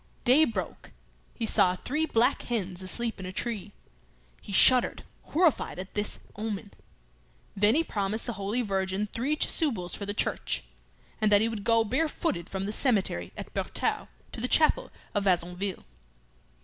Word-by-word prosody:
Day 270 +5 +6
broke. 230 - -5 0.4
He 230 - -2
saw 185 -4 +3
three 300 +11 -1
black 230 -2 +3
hens 195 -6 -3
asleep 225 +4 -3
in 185 - -6
a - - -5
tree. 210 0 -4 0.7
He - - -9
shuddered, 250 +5 +4 0.2
horrified 320 - +1
at 185 +1 -7
this 210 0 -1 0.2
omen. 210 -1 -4 0.8
Then 210 +3 +4
he 325 - +3
promised 210 -3 -2
the 240 - -2
Holy 210 +4 -2
Virgin 195 0 -1
three 270 +6 0
chasubles 230 - 0
for 200 - -4
the 205 - -1
church, - - -1 0.6
and 215 -1 +3
that 205 0 +6
he 225 - +3
would 220 -3 -4
go 230 0 +4
barefooted 260 - -1
from 190 0 -3
the 205 - -2
cemetery 200 - 0
at - - -8
Bertaux - - -1 0.2
to - - -6
the 250 - +1
chapel 320 - +3 0.2
of 205 -1 0
Vassonville. 180 +1 0
210 Hz, 160 wpm, -28 LUFS, 195-245 Hz, 0.8 s, Day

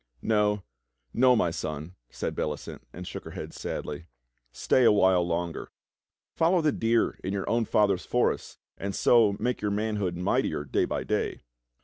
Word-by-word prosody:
"No, 105 -2 +2 0.5
no, 125 +1 +5
my 85 -7 +2
son," 75 +1 -5 0.3
and - - -1
Bellicent 75 -1 -4 0.2
.shook - - -7
her - - -9
head - - -6
sadly, 75 +3 -5 0.4
"stay 125 - +2
a 115 - +7
while 95 -3 +4
longer. 85 -1 -3 0.7
Follow 170 +3 +3
the 155 -2 +2
deer 115 -2 +1
in 95 - -2
your 100 - -2
owm 115 0 +1
father's 100 -5 +2
forests, - - 0 0.2
and 100 0 -3
so 110 -4 +4
make 125 0 -1
your 105 - 0
manhood 105 -4 -1
mightier 85 -4 0
day 70 - +1
by - - -3
day." - - -2
100 Hz, 155 wpm, -27 LUFS, 85-115 Hz, 0.7 s, a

